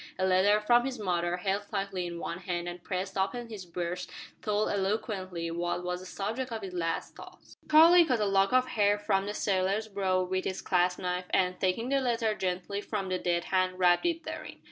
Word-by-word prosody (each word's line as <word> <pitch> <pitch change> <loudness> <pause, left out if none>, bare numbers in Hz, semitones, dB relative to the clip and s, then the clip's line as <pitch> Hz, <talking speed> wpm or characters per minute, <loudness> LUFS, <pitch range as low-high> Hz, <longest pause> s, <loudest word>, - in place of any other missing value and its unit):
A 190 - +1
letter 190 +3 +4
from 240 +3 +4
his 265 0 -3
mother, 175 -3 -1
held 200 +2 -2
tightly 195 -2 -2
in 170 0 -6
one 170 +1 -5
hand 175 -2 -3
and 175 0 -7
pressed 190 0 -3
upon 230 +5 -1
his 200 -5 -8
breast 175 +1 -4 0.3
told 210 0 0
eloquently 190 -4 -2
what 175 +1 -2
was 180 0 -2
the 185 - -10
subject 225 +7 -4
of 220 -2 -4
his 190 -2 -6
last 165 -2 -2
thoughts. - - -14
Charlie 330 +3 +8
cut 255 -8 +1
a 210 - +2
lock 195 +1 +3
of 255 0 +3
hair 205 -3 +2
from 195 -1 0
the 210 - -3
sailor's 195 +2 0
brow 190 -3 0
with 185 +1 -2
his 190 0 -2
clasp 180 0 +2
knife, 180 0 -2
and, 180 -1 +1
taking 195 +6 0
the 275 0 +2
letter 230 -3 +1
gently 190 +1 -3
from 200 -3 -3
the 185 0 -1
dead 170 -1 0
hand, 185 -1 0
wrapped 180 - +4
it 335 -1 -1
therein. - - -7
190 Hz, 210 wpm, -29 LUFS, 180-215 Hz, 0.3 s, Charlie